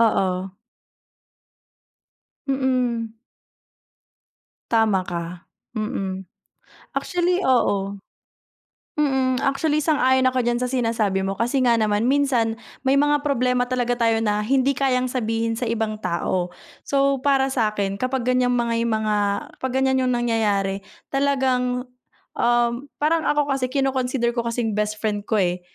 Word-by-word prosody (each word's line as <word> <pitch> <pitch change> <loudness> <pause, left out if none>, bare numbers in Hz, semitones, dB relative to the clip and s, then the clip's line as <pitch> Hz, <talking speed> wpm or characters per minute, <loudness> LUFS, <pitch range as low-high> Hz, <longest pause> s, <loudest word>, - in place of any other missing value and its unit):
Oo. 190 -4 +1 2.0
Mm. 250 -4 0 1.5
Tama 215 -5 +2
ka, 175 0 -6 0.3
mm. 190 -3 -3 0.7
Actually, 355 0 0
oo. 200 -5 +1 1.0
Mm, 265 -3 +1
actually 295 +2 +1
sang-ayon 260 -4 +3
ako 255 0 +2
diyan 240 0 0
sa 250 - -1
sinasabi 225 -6 0
mo 195 0 -2
kasi 245 +4 +1
nga 240 -2 +4
naman 215 +1 +1
minsan, 255 -5 +1 0.2
may 270 0 +2
mga 290 0 +3
problema 250 -3 +1
talaga 245 -1 0
tayo 230 -2 +2
na 210 0 +1
hindi 265 +4 +2
kayang 255 -1 +1
sabihin 230 -2 -1
sa 230 +1 -3
ibang 215 -2 -2
tao. 175 0 -1 0.3
So 275 -1 +1
para 275 -1 +3
sa’kin 210 -4 -1
kapag 255 -1 -1
ganiyang 250 0 +2
may 235 -1 0
mga 215 -1 0 0.4
kapag 260 -1 -2
ganiyan 265 0 +2
yung - - +1
nangyayari, 205 -5 0 0.3
talagang, 260 -3 +1 0.5
um, 240 +3 +1
parang 320 +2 +2
ako 295 0 +2
kasi 255 -2 -1
kino-consider 260 -3 0
ko 235 - 0
kasing 230 -1 -1
bestfriend 210 0 -2
ko, 220 - +2
eh, 180 0 0
240 Hz, 125 wpm, -22 LUFS, 215-265 Hz, 2.0 s, nga